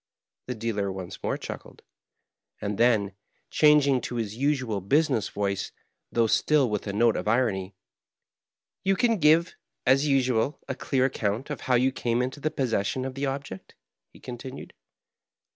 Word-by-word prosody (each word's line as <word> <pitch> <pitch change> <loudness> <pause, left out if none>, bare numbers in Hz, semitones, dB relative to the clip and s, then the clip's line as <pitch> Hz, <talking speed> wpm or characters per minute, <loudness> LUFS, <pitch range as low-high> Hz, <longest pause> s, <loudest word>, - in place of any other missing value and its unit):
The 125 - -3
dealer 105 -3 -2
once 95 -2 -7
more - - -1
chuckled; - - -9 0.8
and 100 0 -3
then, 110 -5 +3 0.4
changing 145 -4 +5
to 120 - -5
his 110 -3 -3
nsual 130 -6 0
business 140 -7 +2
voice, 100 -1 -2 0.4
though 115 -1 +3
still 140 +4 +3
with 105 0 -2
a - - -1
note 115 +2 +3
of - - -3
irony, 105 -5 0 0.6
" - - -66
You 195 0 +2
can 230 0 +2
give, 160 +2 +4 0.3
as 135 +3 +4
nsual, 130 -1 +1
a - - -2
clear 130 -2 0
account 120 +1 -2
of 145 - -5
how 130 - +1
you 130 +2 +3
came 120 -1 0
into 130 +3 -4
the 155 - 0
possession 130 -3 -1
of 130 - -4
the 140 +1 -2
object?" 135 -8 -6 0.4
he - - -17
con 120 -1 -8
tinued. 130 +2 -8
125 Hz, 160 wpm, -26 LUFS, 105-140 Hz, 0.8 s, changing